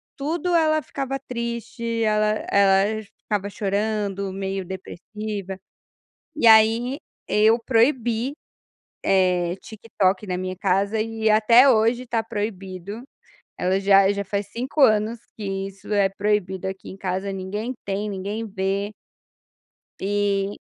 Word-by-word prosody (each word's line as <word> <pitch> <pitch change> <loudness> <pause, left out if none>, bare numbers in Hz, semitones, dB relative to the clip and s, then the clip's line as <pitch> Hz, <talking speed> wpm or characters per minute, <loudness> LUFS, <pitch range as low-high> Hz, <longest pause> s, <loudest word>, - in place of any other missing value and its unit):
tudo 335 +5 -2
ela 310 -1 +3
ficava 270 -2 -4
triste, 235 -2 -4
ela 215 -1 +2 0.2
ela 200 +2 +3 0.2
ficava 205 -2 -2
chorando, 200 -1 -2
meio 195 0 -3
depressiva, 195 +1 -6 0.8
e 265 - +2
aí 225 +4 +5 0.3
eu 220 +2 +4
proibi, 235 +1 +1 0.7
eh, 180 -2 +2
TikTok 210 -3 -1
na 180 -1 -2
minha 185 0 -4
casa 195 +3 +1
e 220 0 -1
até 230 +5 +6
hoje 235 +1 +2
tá 230 -2 0
proibido, 200 0 -5 0.6
ela 185 +1 +1
já 195 0 +5
já 200 0 -3
faz 200 +1 -2
5 255 +8 -4
anos 215 0 +4 0.2
que 195 -2 -3
isso 195 +1 -13
é 200 -2 +3
proibido 195 -2 -1
aqui 190 0 -6
em - - -9
casa 190 +1 -2
ninguém 205 +6 -4
tem, 200 +2 -2
ninguém 200 +3 -4
vê. 200 0 -2 1.1
Ah, - - -11
maravilhoso 200 0 0
isso. - - -22
205 Hz, 125 wpm, -23 LUFS, 195-225 Hz, 1.1 s, até